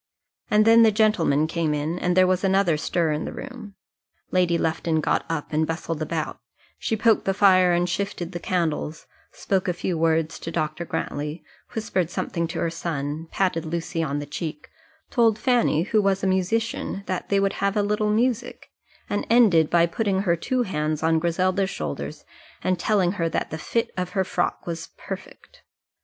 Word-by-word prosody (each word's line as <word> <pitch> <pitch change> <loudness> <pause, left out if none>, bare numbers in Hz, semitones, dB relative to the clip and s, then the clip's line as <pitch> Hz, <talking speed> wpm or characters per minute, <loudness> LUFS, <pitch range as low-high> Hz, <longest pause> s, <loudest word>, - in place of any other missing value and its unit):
And 215 0 +4
then 230 +1 +7
the 225 -1 +6
gentlemen 195 -9 +3
came 160 -2 -1
in, 155 +4 -2
and 180 0 0
there 185 - +7
was 185 0 +1
another 190 -3 +3
stir 160 +1 0
in 150 +1 -1
the - - -4
room. 235 -7 -9 0.6
Lady 180 -2 +2
Lufton 160 0 0
got - - +1
up 160 -2 -3
and 155 +1 +2
bustled 165 -1 -3
about; 155 0 -3 0.4
she 220 - -1
poked 225 0 +3
the 195 - +1
fire 185 -3 +5
and 175 0 +2
shifted 180 -1 -3
the 175 - -5
candles, 165 -3 -2 0.3
spoke 190 -1 -1
a 180 - +1
few 175 -1 -2
words 160 -1 +1
to - - -6
Dr. 155 0 -2
Grantly, 150 0 -4 0.3
whispered 190 -6 -1
something 170 -1 -2
to 165 +1 -6
her 165 - 0
son, 160 -1 -4
patted 180 -4 0
Lucy 165 0 -3
on 145 -3 -1
the 145 - -4
cheek, 150 +1 -6 0.4
told 230 -3 +3
Fanny, 235 - +2
who 215 +3 +2
was 195 -1 +1
a - - +2
musician, 195 +2 -1
that 185 - -3
they 200 - +3
would 195 0 +1
have 200 +1 +1
a 205 - +3
little 210 +1 0
music, 235 +2 -1 0.4
and 205 - -2
ended 205 -10 +5
by 170 -1 +4
putting 190 +2 0
her 175 -4 +2
two 250 +9 -1
hands 155 -5 -2
on 160 0 +3
Griselda's 185 +3 +1
shoulders - - -5 0.4
and 185 -1 +1
telling 195 -5 +2
her 170 -4 -1
that - - -2
the 160 - -4
fit 230 +6 -1
of 180 -1 -3
her 190 - +2
frock 175 -1 -2
was 165 -1 -5
perfect. - - -9
180 Hz, 185 wpm, -24 LUFS, 165-200 Hz, 0.6 s, then